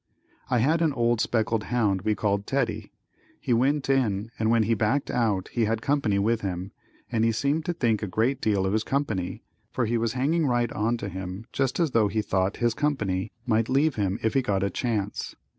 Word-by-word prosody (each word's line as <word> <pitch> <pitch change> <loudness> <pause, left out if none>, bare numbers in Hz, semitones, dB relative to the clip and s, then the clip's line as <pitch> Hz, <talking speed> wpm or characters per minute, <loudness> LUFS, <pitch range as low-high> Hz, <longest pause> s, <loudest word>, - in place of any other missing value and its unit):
I 125 - +2
had 155 +8 +2
an 160 -3 +2
old 120 -2 +1
speckled 110 -1 0
hound 105 -6 +1
we 105 +2 +1
called 100 0 -1
Teddy. - - -1 0.5
He 125 - 0
went 135 +4 +2
in 115 -6 +1
and 110 0 +1
when 115 -1 +4
he 115 +2 +1
backed 110 +6 0
out 105 -6 0
he 115 -2 0
had 110 +1 -1
company 140 -8 +1
with 110 +3 +1
him, 95 0 -4 0.4
and 115 -2 +1
he 115 - +3
seemed 145 +7 0
to 175 - -1
think 115 -8 +1
a 105 - -2
great 115 +8 0
deal 100 -3 +1
of 95 - 0
his 110 0 +1
company, 110 -11 -2 0.3
for 125 - -1
he 115 +1 0
was 115 0 0
hanging 150 +5 +1
right 120 -2 +1
on 115 +3 0
to 105 - -5
him 95 +2 -6
just 135 +2 0
as 165 -5 +2
though 110 -3 +3
he 110 +1 -1
thought 95 +1 0
his 120 -1 +1
company 110 -9 -1
might 115 -2 +1
leave 140 +4 +3
him 100 -3 -1
if 110 -1 +1
he 135 - +3
got 100 -6 0
a 100 - 0
chance. 105 -5 -2
115 Hz, 215 wpm, -26 LUFS, 105-130 Hz, 0.5 s, when